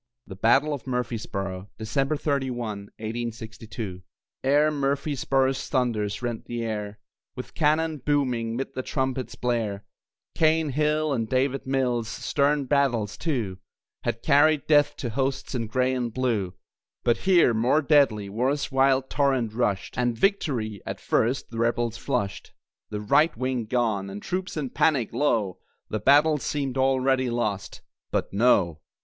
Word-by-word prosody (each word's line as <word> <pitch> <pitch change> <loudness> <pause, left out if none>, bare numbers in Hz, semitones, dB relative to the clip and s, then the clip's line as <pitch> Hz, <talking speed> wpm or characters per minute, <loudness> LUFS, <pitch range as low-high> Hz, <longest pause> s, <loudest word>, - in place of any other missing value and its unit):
THE 95 - -9
BATTLE 135 +9 +3
OF 140 -2 -6
MURFREESBORO 105 -6 -3
[December 135 +7 -1
31, 120 -9 -2
1862] 110 -3 -6 0.4
Ere 145 +3 +4
Murfreesboro's 135 -2 0
thunders 110 -4 -1
rent 120 -2 -3
the 120 -1 -4
air 105 -2 -4 0.4
With 125 - -8
cannon 155 +1 +1
booming 125 -5 0
'mid 135 +3 -4
the 130 - -3
trumpet's 130 -1 -2
blare 115 -5 -2 0.5
Cane 160 -1 +2
Hill 150 +1 +1
and 115 -4 -2
David 130 +1 0
Mills, 125 -4 0
stern 140 +5 0
battles, 125 -7 +1
too, 115 - -2 0.4
Had 115 - -3
carried 150 0 +4
death 145 -1 +4
to 120 - -4
hosts 135 +3 -2
in 115 -3 -2
Gray 130 +3 +1
and 120 -2 -2
Blue. 110 -7 -1 0.5
But 120 - +3
here, 175 -10 +4
more 125 +8 +2
deadly, 135 -9 +3
war's 130 +9 -1
wild 135 0 +3
torrent 135 -7 +1
rushed, 110 -2 -1
And 120 -2 +1
victory, 120 - 0
at - - -5
first, 120 +3 0
the 115 - -5
Rebels 115 0 0
flushed. 100 0 -3 0.4
The 105 -1 -4
"right 140 +7 +3
wing" 130 -1 -1
gone, 110 -5 0
and 100 +1 -6
troops 185 - -4
in 140 -4 -3
panic, 135 -9 +1
lo! 115 -8 0 0.3
The 110 - -2
battle 145 +6 +5
seemed 135 -2 -2
already 130 -1 +2
lost. 110 -5 -3 0.3
But, - - -2
No. 100 -7 +3
125 Hz, 140 wpm, -26 LUFS, 110-140 Hz, 0.5 s, battle